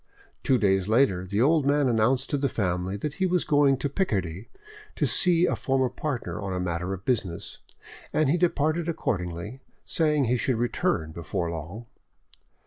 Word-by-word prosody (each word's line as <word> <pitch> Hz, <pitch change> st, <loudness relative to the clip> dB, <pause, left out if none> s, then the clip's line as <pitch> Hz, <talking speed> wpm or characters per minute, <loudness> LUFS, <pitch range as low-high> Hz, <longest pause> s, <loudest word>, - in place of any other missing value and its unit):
Two 130 Hz, -, +3 dB
days 95 Hz, -3 st, +2 dB
later 105 Hz, -6 st, +2 dB
the 100 Hz, +5 st, +1 dB
old 155 Hz, +2 st, +3 dB
man 145 Hz, 0 st, +2 dB
announced 125 Hz, +3 st, +1 dB
to 145 Hz, -, +1 dB
the 140 Hz, 0 st, 0 dB
family 90 Hz, -1 st, -2 dB
that 140 Hz, +7 st, -4 dB
he 190 Hz, -, +4 dB
was 180 Hz, -1 st, +1 dB
going 145 Hz, -3 st, +3 dB
to 145 Hz, -, -2 dB
Picardy 100 Hz, -, -2 dB, 0.5 s
to -, -, +1 dB
see 175 Hz, -2 st, +4 dB
a -, -, 0 dB
former 130 Hz, -1 st, 0 dB
partner 130 Hz, -3 st, -4 dB
on 95 Hz, -1 st, -3 dB
a 90 Hz, -, -2 dB
matter 90 Hz, 0 st, -2 dB
of 95 Hz, 0 st, -6 dB
business, 100 Hz, -7 st, -2 dB, 0.5 s
and 155 Hz, -, +2 dB
he 145 Hz, -, +3 dB
departed 165 Hz, 0 st, +1 dB
accordingly, 90 Hz, -, -3 dB, 0.3 s
saying 150 Hz, -4 st, +1 dB
he 125 Hz, +2 st, +1 dB
should 115 Hz, +3 st, 0 dB
return 110 Hz, -9 st, -1 dB
before 85 Hz, +1 st, -3 dB
long. 85 Hz, +8 st, -7 dB
120 Hz, 170 wpm, -26 LUFS, 95-145 Hz, 0.5 s, he